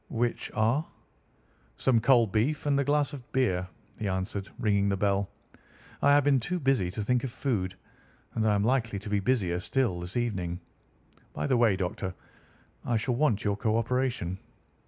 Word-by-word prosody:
"Which 120 Hz, 0 st, -1 dB
are?" 115 Hz, +7 st, +2 dB, 0.9 s
"Some 125 Hz, -3 st, +3 dB
cold 120 Hz, -3 st, +4 dB
beef 130 Hz, +10 st, 0 dB
and 140 Hz, -1 st, +2 dB
a -, -, +2 dB
glass 145 Hz, 0 st, +1 dB
of 130 Hz, -4 st, -10 dB
beer," 95 Hz, -9 st, +1 dB, 0.3 s
he 105 Hz, -, -2 dB
answered, 95 Hz, +1 st, -3 dB
ringing 100 Hz, -2 st, +2 dB
the 100 Hz, -, 0 dB
bell. 100 Hz, 0 st, +1 dB, 0.7 s
"I 140 Hz, -, +4 dB
have 145 Hz, 0 st, +6 dB
been 140 Hz, -1 st, +4 dB
too 175 Hz, +9 st, -2 dB
busy 130 Hz, -, +2 dB
to 105 Hz, +3 st, -4 dB
think 125 Hz, +3 st, +1 dB
of 130 Hz, -, -3 dB
food, 100 Hz, -9 st, -2 dB, 0.6 s
and 110 Hz, 0 st, 0 dB
I 105 Hz, -, +3 dB
am 100 Hz, -, +1 dB
likely 115 Hz, -3 st, +1 dB
to 100 Hz, +2 st, -7 dB
be 100 Hz, -, +2 dB
busier 95 Hz, -5 st, +1 dB
still 110 Hz, -2 st, 0 dB
this 90 Hz, +5 st, -5 dB
evening. 95 Hz, -8 st, -2 dB, 0.7 s
By 75 Hz, -, -3 dB
the 125 Hz, -, +2 dB
way, 115 Hz, -4 st, +4 dB
Doctor, 95 Hz, 0 st, -3 dB, 0.7 s
I 120 Hz, -, +1 dB
shall 120 Hz, +4 st, -1 dB
want 120 Hz, -5 st, +1 dB
your 100 Hz, -1 st, +1 dB
co 110 Hz, 0 st, +1 dB
operation." 115 Hz, -6 st, -1 dB
110 Hz, 180 wpm, -28 LUFS, 95-130 Hz, 0.9 s, have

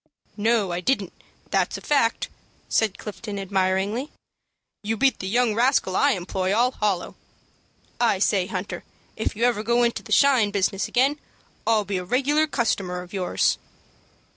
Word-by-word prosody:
"No, 215 Hz, -3 st, +1 dB
I 175 Hz, -, -2 dB
didn't, 205 Hz, -4 st, 0 dB, 0.4 s
that's -, -, +1 dB
a -, -, -7 dB
fact," 275 Hz, -6 st, +1 dB, 0.4 s
said 215 Hz, -3 st, +1 dB
Clifton, 210 Hz, 0 st, -7 dB
admiringly. 195 Hz, +6 st, -1 dB, 0.7 s
"You 220 Hz, +2 st, -2 dB
beat 270 Hz, +3 st, +2 dB
the 190 Hz, -, -4 dB
young 235 Hz, +2 st, +2 dB
rascal 235 Hz, -5 st, +2 dB
I 285 Hz, +5 st, +4 dB
employ 190 Hz, +1 st, -1 dB
all 245 Hz, +3 st, +3 dB
hollow. 205 Hz, -7 st, -1 dB, 0.9 s
I 235 Hz, -4 st, +3 dB
say, 190 Hz, -1 st, +1 dB
Hunter, 190 Hz, 0 st, -5 dB, 0.3 s
if 220 Hz, -, -2 dB
you 225 Hz, -, -2 dB
ever 240 Hz, -3 st, +2 dB
go 235 Hz, +2 st, +2 dB
into 235 Hz, -1 st, 0 dB
the -, -, -13 dB
'shine' 260 Hz, -7 st, +5 dB
business 200 Hz, -1 st, 0 dB
again, 275 Hz, +4 st, +2 dB, 0.5 s
I'll 220 Hz, -2 st, +3 dB
be 195 Hz, 0 st, -2 dB
a 180 Hz, -, -3 dB
regular 280 Hz, +9 st, +2 dB
customer 195 Hz, -9 st, -1 dB
of 180 Hz, -, -15 dB
yours." 185 Hz, -2 st, +1 dB
215 Hz, 155 wpm, -24 LUFS, 190-245 Hz, 0.9 s, shine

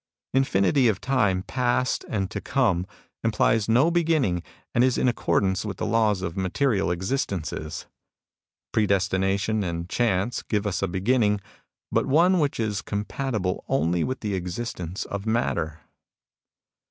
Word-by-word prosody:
Infinity 130 Hz, 0 st, +3 dB
of 105 Hz, -4 st, +1 dB
time 105 Hz, -9 st, +1 dB
past 125 Hz, +1 st, 0 dB
and 95 Hz, -3 st, -2 dB
to -, -, -4 dB
come 100 Hz, -10 st, +1 dB, 0.4 s
implies 115 Hz, -1 st, +2 dB
no 130 Hz, +9 st, +4 dB
beginning 155 Hz, -, +2 dB, 0.3 s
and 120 Hz, -, +4 dB
is 130 Hz, -1 st, +2 dB
in -, -, +2 dB
accordance 100 Hz, -5 st, +1 dB
with 100 Hz, -4 st, -5 dB
the -, -, -2 dB
laws 105 Hz, -3 st, +2 dB
of 85 Hz, -, -3 dB
material 95 Hz, +2 st, +1 dB
existences. 90 Hz, -, -3 dB, 0.9 s
Pre 110 Hz, -2 st, +2 dB
destination 100 Hz, +2 st, +1 dB
and 85 Hz, -1 st, -3 dB
Chance 115 Hz, 0 st, 0 dB
give 105 Hz, -1 st, -1 dB
us 100 Hz, -3 st, -1 dB
a 100 Hz, -, +1 dB
beginning, 105 Hz, +3 st, +2 dB, 0.5 s
but -, -, +1 dB
one 175 Hz, +6 st, +4 dB
which 145 Hz, -5 st, 0 dB
is 105 Hz, -3 st, -1 dB
compatible 105 Hz, -2 st, -2 dB
only 85 Hz, +2 st, +1 dB
with 130 Hz, -, -3 dB
the 105 Hz, -2 st, -2 dB
existence 90 Hz, -1 st, -4 dB
of 100 Hz, +1 st, -5 dB
matter. 85 Hz, -8 st, -1 dB
105 Hz, 140 wpm, -25 LUFS, 95-125 Hz, 0.9 s, no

